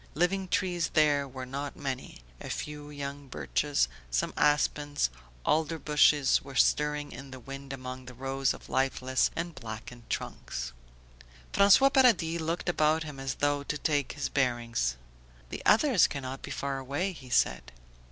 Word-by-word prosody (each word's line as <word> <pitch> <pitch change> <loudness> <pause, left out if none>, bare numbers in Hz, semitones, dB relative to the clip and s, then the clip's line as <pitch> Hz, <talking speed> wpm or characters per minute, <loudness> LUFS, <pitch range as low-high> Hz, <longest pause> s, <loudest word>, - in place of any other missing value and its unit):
Living 185 +4 +1
trees 180 -3 0
there 145 -2 +4
were 130 -1 -7
not 140 +2 -5
many; 135 - -5 0.2
a - - -7
few 150 -1 -5
young 140 -1 -6
birches, 145 - 0 0.2
some - - 0
aspens, 145 - +2 0.3
alder 160 +1 +1
bushes 150 -1 +4
were 135 -1 -11
stirring 150 +3 +2
in 140 0 -9
the 130 0 -9
wind 135 +2 -8
among 130 -1 -6
the 125 -1 -10
rows 135 +1 0
of - - -8
lifeless 130 -1 +1
and 170 0 -3
blackened 115 -1 -9
trunks. - - -4 0.8
François 205 +8 +6
Paradis 185 -11 +4
looked 165 +2 -2
about 155 -2 +2
him 150 -3 -8
as 135 -1 -3
though 145 0 +1
to 150 +1 -3
take 145 -2 0
his 145 - -2
bearings. 120 - 0 0.5
"The - - -5
others 230 - +5
cannot 135 -1 -5
be - - -8
far 140 -1 -3
away," 145 +9 -2
he 130 -6 -12
said. 65 - +1
140 Hz, 150 wpm, -29 LUFS, 130-155 Hz, 0.8 s, François